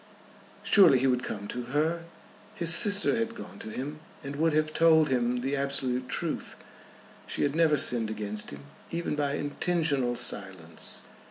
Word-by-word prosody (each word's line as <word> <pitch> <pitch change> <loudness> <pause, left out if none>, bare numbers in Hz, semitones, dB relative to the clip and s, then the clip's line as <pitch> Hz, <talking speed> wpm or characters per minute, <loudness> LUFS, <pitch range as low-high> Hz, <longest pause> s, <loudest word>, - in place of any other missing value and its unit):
Surely 175 -10 +6
he 130 - 0
would 125 -2 +1
come 100 -4 -6
to 125 +2 -5
her! 160 +6 -1 0.5
His 165 -1 +3
sister 205 +1 +5
had 230 0 -2
gone 100 - -10
to - - -8
him, 140 +7 -6 0.2
and 140 +1 -6
would 160 +2 +1
have 155 0 0
told 160 -2 +4
him 125 -1 0
the 135 +3 -2
absolute 130 -2 -1
truth. - - -3 0.7
She - - -2
had 145 +1 0
never 160 -2 +3
sinned 115 -4 +3
against 105 -1 -3
him, 70 0 -9 0.3
even 170 -2 -3
by 145 -1 -1
intentional 145 -4 -1
silence. 95 -7 -3
140 Hz, 160 wpm, -28 LUFS, 120-160 Hz, 0.7 s, Surely